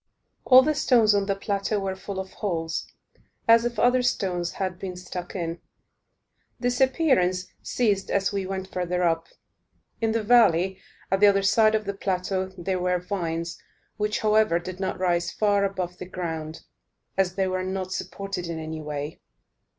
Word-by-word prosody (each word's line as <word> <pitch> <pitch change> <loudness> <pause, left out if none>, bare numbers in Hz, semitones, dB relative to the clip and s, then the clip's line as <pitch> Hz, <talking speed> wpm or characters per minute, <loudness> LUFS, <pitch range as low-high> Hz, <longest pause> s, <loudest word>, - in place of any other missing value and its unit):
All 260 0 +8
the 305 +3 +2
stones 235 -7 +4
on 200 -1 +1
the 195 - +1
plateau 200 +1 -1
were 195 -1 -2
full 190 0 -6
of 190 0 -6
holes, 165 -5 -3 0.6
as 230 +1 +6
if 240 -1 -2
other 250 +3 +4
stones 185 -8 -1
had 185 -2 -3
been 185 -2 -5
stuck 180 0 -7
in. 170 -2 -3 1.0
This 245 +1 0
appearance 260 - +2 0.2
ceased 205 -5 0
as 200 +1 +1
we 195 -2 -2
went 190 0 -5
further 180 0 -1
up. 165 -1 +1 0.7
In 225 -1 +2
the 225 0 0
valley, 195 -5 +4 0.3
at 195 - +3
the 205 - +7
other 195 -1 +4
side 215 +2 +4
of 215 0 -1
the 200 - -2
plateau, 190 -1 -2
there 185 +1 -2
were 180 0 +1
vines, 170 -3 -4 0.4
which, 210 0 -1
however, 215 -4 +3
did 180 +1 -6
not 190 -1 -2
rise 175 -2 +1
far 205 -2 +2
above 185 -2 -3
the 180 - -7
ground, 160 -3 -5 0.5
as 190 -2 +1
they 190 -1 +1
were 185 0 -1
not 185 0 -3
supported 195 -2 -4
in 170 -1 -4
any 160 0 -5
way. 150 0 -5
190 Hz, 170 wpm, -25 LUFS, 180-210 Hz, 1.0 s, All